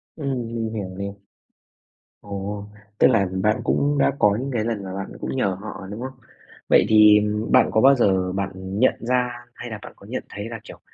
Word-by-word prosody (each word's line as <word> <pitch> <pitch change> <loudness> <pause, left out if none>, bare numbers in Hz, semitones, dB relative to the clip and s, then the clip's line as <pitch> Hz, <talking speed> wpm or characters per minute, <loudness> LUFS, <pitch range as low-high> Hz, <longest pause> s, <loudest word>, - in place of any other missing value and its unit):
Ừm, 135 -6 -3
mình 115 -1 -3
hiểu 100 -4 -4
này. 100 0 -5 1.1
Ồ! 100 0 -5 0.3
Tức - - +6
là 100 -4 +3
bạn 105 +1 +2
cũng 145 0 +1
đã - - +3
có 105 0 +4
những 135 +2 -4
cái 110 -3 0
lần 110 -3 -2
mà 95 -1 -6
bạn 95 0 -5
cũng - - -4
nhờ 95 -7 0
họ, 105 -3 -7
đúng 105 +3 -6
không? 130 +1 -5 0.6
Vậy - - +5
thì 105 -1 +7 0.3
bạn 130 - +5
có 110 - +3
bao 135 +1 +7
giờ 95 -6 +2
bạn 95 0 -2
nhận 95 +6 +1
ra 125 +1 +1 0.3
hay 120 - -8
là 110 - -5
bạn - - -10
có 100 - -16
nhận 125 +4 -4
thấy 100 +2 -6
là, 115 -2 -7
kiểu, - - -12
105 Hz, 210 wpm, -23 LUFS, 100-120 Hz, 1.1 s, thì